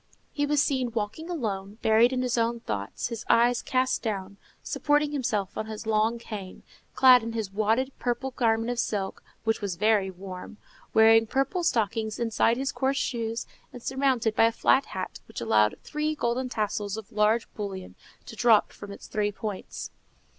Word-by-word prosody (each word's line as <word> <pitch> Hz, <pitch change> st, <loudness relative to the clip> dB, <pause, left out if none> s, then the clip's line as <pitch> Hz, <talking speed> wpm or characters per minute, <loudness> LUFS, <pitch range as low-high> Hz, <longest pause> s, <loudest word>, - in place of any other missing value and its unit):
He 290 Hz, 0 st, 0 dB
was 295 Hz, 0 st, +3 dB
seen 260 Hz, -4 st, 0 dB
walking 225 Hz, +10 st, -3 dB
alone, 210 Hz, -, -3 dB
buried 225 Hz, +3 st, +5 dB
in 255 Hz, -1 st, -1 dB
his 250 Hz, -1 st, 0 dB
own 230 Hz, 0 st, 0 dB
thoughts, 100 Hz, -, -4 dB
his 230 Hz, -1 st, -5 dB
eyes 240 Hz, +1 st, +4 dB
cast 255 Hz, 0 st, 0 dB
down, 200 Hz, -3 st, -4 dB, 0.3 s
supporting 295 Hz, 0 st, +1 dB
himself 215 Hz, -9 st, -1 dB
on 215 Hz, -, -3 dB
his 220 Hz, +1 st, -7 dB
long 220 Hz, +1 st, +2 dB
cane, 205 Hz, -5 st, -8 dB, 0.3 s
clad 255 Hz, -2 st, +7 dB
in 225 Hz, 0 st, -5 dB
his 215 Hz, -4 st, -4 dB
wadded 225 Hz, +6 st, +1 dB
purple 260 Hz, +2 st, -2 dB
garment 230 Hz, -1 st, +1 dB
of 245 Hz, -, -3 dB
silk, 200 Hz, -4 st, -2 dB, 0.2 s
which 225 Hz, 0 st, 0 dB
was 200 Hz, -4 st, -2 dB
very 210 Hz, 0 st, +2 dB
warm, 185 Hz, +2 st, -9 dB, 0.3 s
wearing 225 Hz, 0 st, +6 dB
purple 275 Hz, -, 0 dB
stockings 220 Hz, -5 st, 0 dB
inside 230 Hz, 0 st, +2 dB
his 270 Hz, +1 st, -1 dB
coarse 270 Hz, 0 st, 0 dB
shoes, 230 Hz, -3 st, -2 dB, 0.3 s
and 245 Hz, -, -11 dB
surmounted 260 Hz, -5 st, +1 dB
by -, -, +5 dB
a 230 Hz, -, +3 dB
flat 265 Hz, +3 st, +3 dB
hat 185 Hz, -1 st, -6 dB
which -, -, -7 dB
allowed 105 Hz, -2 st, +3 dB
three 305 Hz, 0 st, -2 dB
golden 250 Hz, -1 st, -1 dB
tassels 210 Hz, -2 st, -2 dB
of 220 Hz, 0 st, -9 dB
large 215 Hz, +1 st, +2 dB
bullion 195 Hz, -3 st, -6 dB, 0.3 s
to 225 Hz, -, -9 dB
droop 225 Hz, -2 st, +4 dB
from 205 Hz, -, -10 dB
its 200 Hz, -, -10 dB
three 210 Hz, -1 st, -1 dB
points. 205 Hz, -1 st, -6 dB
225 Hz, 175 wpm, -27 LUFS, 210-250 Hz, 0.3 s, clad